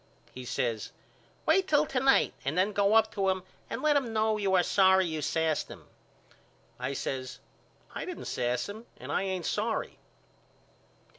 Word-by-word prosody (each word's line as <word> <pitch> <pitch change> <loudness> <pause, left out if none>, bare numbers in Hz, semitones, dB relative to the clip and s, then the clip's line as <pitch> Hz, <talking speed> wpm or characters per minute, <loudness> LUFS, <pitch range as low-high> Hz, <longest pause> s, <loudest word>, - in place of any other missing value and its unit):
He 130 0 -8
says 115 -3 -2 0.5
Wait 380 -1 +3
till 300 -2 +4
to 265 - -1
night 270 +1 +4
and 140 +5 -2
then 190 +3 +3
go 200 +1 +3
up 220 -1 +4
to 195 -2 +1
him 185 -1 -1 0.3
and - - -4
let 305 -1 +4
him 255 -5 0
know 220 0 +2
you 195 -2 +1
are 180 - +5
sorry 190 0 +4
you 160 -2 -3
sassed 160 +1 0
him. - - -11 0.9
I 130 +2 -2
says 130 -1 -4 0.6
I - - -4
didn't - - -7
sass 125 0 -1
him 220 +3 -9
and - - -7
I - - +1
ain't 190 -3 -2
sorry. 220 +2 -2
190 Hz, 170 wpm, -29 LUFS, 155-220 Hz, 0.9 s, are